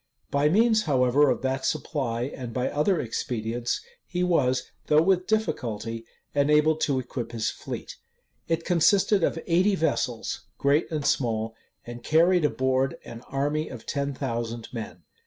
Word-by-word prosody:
By 140 +1 +3
means, 220 +4 +3
however, 135 0 +4
of - - -1
that 130 0 -1
supply, 130 -5 -1
and 125 -3 -6
by 125 - 0
other 160 +4 +2
expedients, 115 0 -2 0.3
he 180 0 -1
was, 130 -8 +2 0.2
though 155 +1 +5
with 185 0 +2
difficulty, 115 - -2 0.3
enabled 150 +2 +3
to 140 -3 +1
equip 120 -1 -5
his 115 -1 -1
fleet. - - -7 0.5
It 165 0 -1
consisted 190 +2 +3
of - - +1
eighty 185 +4 +3
vessels, 130 -8 -1
great 140 +3 +2
and 155 -4 -3
small; 115 -5 0 0.3
and 120 0 -8
carried 170 +1 +4
an - - +1
board 130 0 +1
an 115 0 -9
army 145 +3 -1
of - - -9
ten 140 -1 -2
thousand 115 -3 -4
men. 115 -3 -7
140 Hz, 150 wpm, -26 LUFS, 120-165 Hz, 0.5 s, though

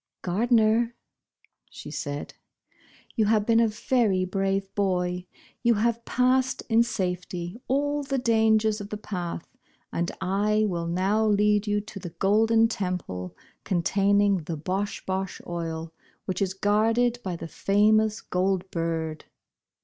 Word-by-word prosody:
"Gardner," 225 +4 +2 0.7
said 145 -1 -6
she, - - -11
"you - - +4
have 210 -1 +2
been 230 0 +4
a 230 - +4
very 210 -3 +1
brave 195 +1 -1
boy. 180 -2 -1 0.3
You 235 -1 +3
have 230 +2 0
passed 255 +1 +1
in 225 0 +5
safety 180 -2 -3
all 290 +2 +1
the 275 -1 -2
dangers 220 -3 +2
of 200 - -8
the 210 - -4
path, 175 -5 -5 0.5
and 170 +1 -1
I 205 +3 +1
will 170 -3 -2
now 195 +6 +1
lead 210 0 +3
you 205 0 +1
to 210 -1 -9
the 180 - -6
Golden 225 +4 +4
Temple, 180 - -4 0.3
containing 200 +2 +2
the 165 -1 -5
Bosh 195 +6 -3
Bosh 190 0 -3
Oil, 165 -1 -4 0.3
which 185 - -3
is 190 -1 0
guarded 225 +4 +2
by 185 -2 -3
the 165 - -7
famous 215 +4 +2
Gold 185 0 -1
Bird." 165 -2 -3
200 Hz, 135 wpm, -26 LUFS, 180-220 Hz, 0.7 s, in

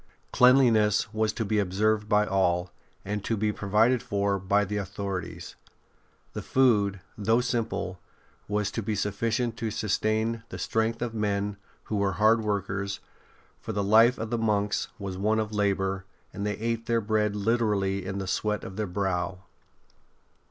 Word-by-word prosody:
Cleanliness 115 -5 +4
was 110 0 +1
to 115 - -2
be 105 +1 +1
observed 105 +2 +1
by 105 -1 +4
all, 90 -3 +1 0.3
and 105 +1 -3
to 115 - -1
be 105 +1 +1
provided 110 +5 +2
for 100 -1 0
by 100 +2 +2
the 105 +2 -3
authorities. 95 -3 -5 0.8
The - - -4
food, 105 -7 +2
though 110 +3 +2
simple, 115 -7 -2 0.5
was 105 0 -1
to 115 - -3
be 105 0 -2
sufficient 115 +3 -1
to 115 -2 -2
sustain 110 +2 0
the - - -7
strength 110 +1 -1
of 120 -2 -3
men 105 -2 -1 0.3
who 105 - -3
were 100 -1 +1
hard 110 +4 +4
workers, 100 -1 -2 0.6
for 110 - -6
the 100 0 0
life 115 +5 +5
of 110 0 -5
the 120 - 0
monks 105 -2 0
was 95 -2 -5
one 110 +2 +2
of 110 -1 -2
labour, 95 -2 0 0.3
and 100 +1 -3
they 105 -1 -2
ate 115 +1 -2
their 115 -1 +2
bread 105 -1 0
literally 105 -3 0
in 95 +1 -4
the 95 - -3
sweat 105 +2 -1
of 95 - -8
their 110 -1 -1
brow. 90 0 -2
105 Hz, 160 wpm, -27 LUFS, 100-110 Hz, 0.8 s, life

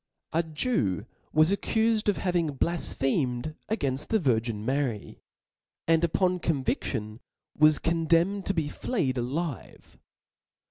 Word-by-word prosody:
A 165 - +3
Jew 155 - -1 0.3
was 155 +3 +4
accufed 220 +1 +1
of 205 - +1
having 175 -5 0
blafphemed 135 -4 0 0.2
againft 140 - -1
the 225 - +2
Virgin, 115 - 0
Mary; 130 -5 -2 0.7
and 165 0 +3
upon 180 +2 +2
conviAion 130 -8 -2 0.4
was 155 0 +5
con 165 -1 -1
demned 180 +4 +2
to 195 - 0
be 160 -3 0
flead 145 - -1
alive. 140 +4 -5
155 Hz, 120 wpm, -27 LUFS, 130-175 Hz, 0.7 s, was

